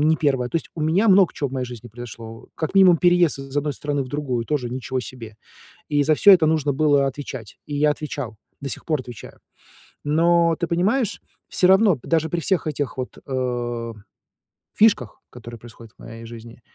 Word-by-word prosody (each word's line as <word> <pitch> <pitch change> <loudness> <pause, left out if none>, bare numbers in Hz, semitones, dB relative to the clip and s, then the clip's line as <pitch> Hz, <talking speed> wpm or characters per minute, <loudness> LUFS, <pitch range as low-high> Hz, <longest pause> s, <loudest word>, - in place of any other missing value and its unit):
не 160 - +3
1. 135 -5 0
То 165 - -2
есть, - - -5
у 165 - -6
меня 165 +8 +2
много 190 -2 +5
чего 140 -3 -3
в - - -13
моей 130 -2 -3
жизни 120 -1 -10
произошло. 115 -1 -10
Как 160 +4 -4
минимум 190 -3 +7
переезд 175 -3 +3
из 135 0 -10
одной 145 0 -2
страны 145 -1 -2
в 130 - -9
другую 130 -5 -3
тоже, 135 -5 -2
ничего 130 +1 -3
себе. 115 -2 -10 0.5
И 145 -1 +2
за 155 +2 +3
всё 200 +6 +7
это 175 -4 +5
нужно 155 -2 +1
было 145 -1 +3
отвечать, 130 -5 -7
и 145 - -4
я 150 +1 +3
отвечал, 145 -6 -5 0.2
до 140 - -5
сих - - -5
пор 155 -4 0
отвечаю. 120 -2 -11 0.7
Но 170 +2 +3
ты 170 - -1
понимаешь, 200 +8 0 0.3
всё 180 - +2
равно 190 -4 +5
даже 160 -1 0
при 175 - -1
всех 185 +1 0
этих 145 -2 -3
вот, 130 -1 -6
э, 120 -3 -3 0.8
фишках, 205 - +2
которые 120 -1 -10
происходят 115 0 -14
в - - -55
моей 115 0 -10
жизни, 115 +1 -11
145 Hz, 195 wpm, -22 LUFS, 125-165 Hz, 0.8 s, минимум